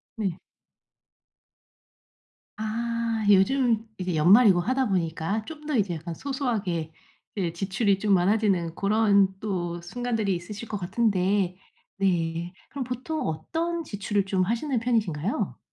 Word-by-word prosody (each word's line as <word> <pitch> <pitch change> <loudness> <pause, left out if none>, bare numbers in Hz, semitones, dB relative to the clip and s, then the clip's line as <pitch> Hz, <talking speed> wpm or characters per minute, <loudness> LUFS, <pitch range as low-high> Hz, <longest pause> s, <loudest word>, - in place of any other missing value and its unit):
네. 195 -6 -2 2.2
아 230 0 -2
요즘 230 +2 +3
이게 185 -2 -2
연말이고 190 +5 +6
하다 255 +8 +1
보니까 175 +3 -1
좀 300 +1 -10
더 300 -2 -1
이제 195 -7 +1
약간 165 +2 -6
소소하게 210 - -2 0.4
이 180 -4 -1
지출이 195 +2 +1
좀 205 +1 +1
많아지는 185 -3 +2
고런 200 -2 +3
또 175 -4 -3
순간들이 220 0 -1
있으실 205 +6 -7
것 210 - -3
같은데 190 -1 +1 0.4
네. 175 -2 0 0.2
그럼 280 -2 -4
보통 255 +5 -3
어떤 325 - -2
지출을 205 -5 -1
좀 190 -1 +1
하시는 235 +7 -1
편이신가요? 210 -4 -1
200 Hz, 255 characters per minute, -26 LUFS, 180-230 Hz, 2.2 s, 연말이고